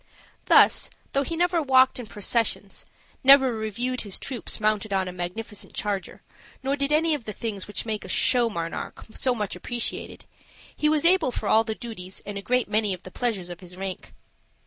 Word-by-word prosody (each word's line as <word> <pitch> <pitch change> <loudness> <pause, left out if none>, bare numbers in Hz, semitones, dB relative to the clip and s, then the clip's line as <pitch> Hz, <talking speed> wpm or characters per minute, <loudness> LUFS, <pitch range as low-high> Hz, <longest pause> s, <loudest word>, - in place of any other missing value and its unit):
Thus, - - +6 0.2
though 275 - +2
he 330 +4 -3
never 350 -1 +2
walked 260 -3 +4
in 240 - -7
processions, 210 -1 -1 0.4
never 270 -2 +7
reviewed 230 +4 -2
his 200 -3 -3
troops 255 -4 -3
mounted 215 0 0
on 190 -1 +1
a - - -4
magnificent 200 +4 -6
charger, 205 -2 -3 0.4
nor 270 +1 +1
did 280 0 0
any 315 +1 +3
of 280 -6 -3
the 215 - -5
things 205 -3 -4
which 205 - -4
make 215 -2 -3
a - - -9
show 245 -2 +3
monarch 170 -5 -5
so 255 -2 +1
much 210 -5 -3
appreciated, 240 +6 -4 0.5
he 300 - +2
was 310 0 +1
able 345 -6 +4
for - - -3
all 220 +1 +5
the 220 -1 -4
duties 190 -6 -8
and 205 - -6
a 200 - -4
great 250 +4 +1
many 210 -2 +2
of 180 - -19
the 185 - -10
pleasures 210 -7 -2
of 175 -1 -8
his 180 -1 -11
rank. 190 -1 -6
225 Hz, 190 wpm, -25 LUFS, 200-260 Hz, 0.5 s, never